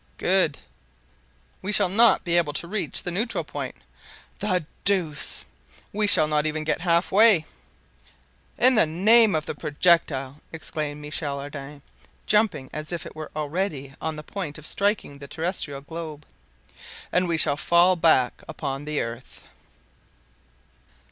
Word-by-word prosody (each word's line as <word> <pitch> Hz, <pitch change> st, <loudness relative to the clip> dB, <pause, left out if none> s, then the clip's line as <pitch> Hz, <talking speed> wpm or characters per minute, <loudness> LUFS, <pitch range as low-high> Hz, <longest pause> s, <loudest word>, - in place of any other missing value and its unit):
"Good." 180 Hz, -6 st, +2 dB, 1.0 s
"We 195 Hz, -, -3 dB
shall 205 Hz, -2 st, +4 dB
not 225 Hz, +5 st, +4 dB
be 170 Hz, -1 st, 0 dB
able 165 Hz, -4 st, +1 dB
to 170 Hz, -, -2 dB
reach 210 Hz, +3 st, -3 dB
the 180 Hz, -, -3 dB
neutral 215 Hz, +7 st, -1 dB
point." -, -, -6 dB, 0.6 s
"The 185 Hz, -5 st, -1 dB, 0.2 s
deuce!" 175 Hz, -7 st, +1 dB, 0.5 s
"We 210 Hz, 0 st, +1 dB
shall 155 Hz, -6 st, +6 dB
not 150 Hz, 0 st, 0 dB
even 155 Hz, 0 st, -2 dB
get 155 Hz, +2 st, -1 dB
halfway." 180 Hz, +2 st, +4 dB, 1.1 s
"In 255 Hz, +2 st, +6 dB
the 215 Hz, -9 st, +4 dB
name 210 Hz, +6 st, +5 dB
of 155 Hz, -1 st, -1 dB
the -, -, -4 dB
projectile!" 145 Hz, -3 st, +1 dB
exclaimed 155 Hz, -2 st, -5 dB
Michel 150 Hz, -1 st, -2 dB
Ardan, 140 Hz, 0 st, -9 dB, 0.4 s
jumping 210 Hz, -11 st, +1 dB
as 155 Hz, +1 st, -6 dB
if 170 Hz, -2 st, -4 dB
it -, -, -10 dB
was 155 Hz, -1 st, -7 dB
already 150 Hz, -2 st, -3 dB
on 160 Hz, -1 st, -3 dB
the 150 Hz, -, -8 dB
point 165 Hz, -4 st, -6 dB
of 155 Hz, -, -12 dB
striking 200 Hz, -9 st, 0 dB
the 140 Hz, -, -9 dB
terrestrial 160 Hz, -4 st, -3 dB
globe. 155 Hz, -1 st, -8 dB, 0.9 s
"And 180 Hz, 0 st, +2 dB
we 165 Hz, -1 st, 0 dB
shall 145 Hz, -2 st, +3 dB
fall 175 Hz, +5 st, +3 dB
back 160 Hz, -7 st, +2 dB
upon 135 Hz, +1 st, -5 dB
the 150 Hz, -1 st, -2 dB
earth!" 115 Hz, +2 st, -8 dB
160 Hz, 140 wpm, -24 LUFS, 145-185 Hz, 1.1 s, shall